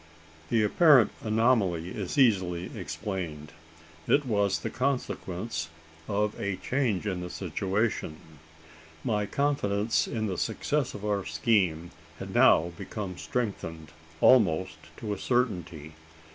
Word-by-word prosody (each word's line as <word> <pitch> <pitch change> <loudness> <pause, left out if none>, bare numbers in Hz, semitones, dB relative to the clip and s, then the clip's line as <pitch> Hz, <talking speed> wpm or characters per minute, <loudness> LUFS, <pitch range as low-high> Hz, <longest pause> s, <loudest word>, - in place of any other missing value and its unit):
The 110 -2 +3
apparent 135 - +5
anomaly 110 -7 +2
is 95 +4 -5
easily 95 -9 +2
explained. 85 -8 -5 0.6
It 145 0 +3
was 100 -5 +1
the - - -5
consequence 110 - -2 0.4
of 105 0 0
a 100 -1 -1
change 110 0 -1
in 95 -3 -2
the 90 - -5
situation. 95 -1 -2 0.9
My 105 -2 0
confidence 115 -5 0
in 110 -2 -2
the 95 -4 -3
success 145 -3 -1
of 105 - -7
our 100 -2 0
scheme 85 -1 +1 0.3
had - - -7
now 85 +2 +5
become 95 -5 -6
strengthened 80 -10 -4 0.3
almost 95 -10 +4 0.2
to 105 -2 -3
a 100 - -6
certainty. 90 - -1
100 Hz, 120 wpm, -28 LUFS, 90-115 Hz, 0.9 s, apparent